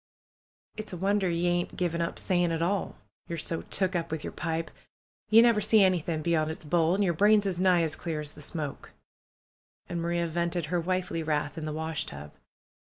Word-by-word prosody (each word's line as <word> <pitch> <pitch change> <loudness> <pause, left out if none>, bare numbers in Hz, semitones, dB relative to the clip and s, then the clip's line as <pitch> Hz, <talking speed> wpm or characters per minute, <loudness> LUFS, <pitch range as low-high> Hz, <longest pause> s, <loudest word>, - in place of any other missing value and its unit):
"It's 215 -2 -5
a - - -4
wonder 195 +1 +1
ye 170 +1 0
ain't 175 0 -1
given 170 -2 0
up 170 - -2
saying 175 -3 +1
at 165 0 0
all! 195 +3 -1 0.3
Ye're 170 - -4
so 165 +1 -2
took 190 -1 -1
up 170 -1 -1
with 160 -1 -4
yer - - -4
pipe. 165 -1 -3 0.6
Ye 225 +1 +8
never 230 -3 +4
see 210 0 +5
anything 170 -4 +1
bey 170 - +1
on' 155 -1 +2
its 160 0 -7
bowl, 165 +2 +2
an' 205 - +1
yer 175 -3 +2
brains 205 +4 +4
is 185 -3 -1
nigh 180 -2 +4
as 160 -2 -1
clear 160 -3 -4
as 150 -1 -5
the 150 - -12
smoke." 150 -1 -5 0.9
And 170 -1 -3
Maria 170 0 0
vented 170 0 -1
her 175 - +3
wifely 185 -1 -1
wrath 150 -2 -1
in 160 -2 -5
the 155 - -3
washtub. 145 - -4
170 Hz, 205 wpm, -28 LUFS, 160-185 Hz, 0.9 s, Ye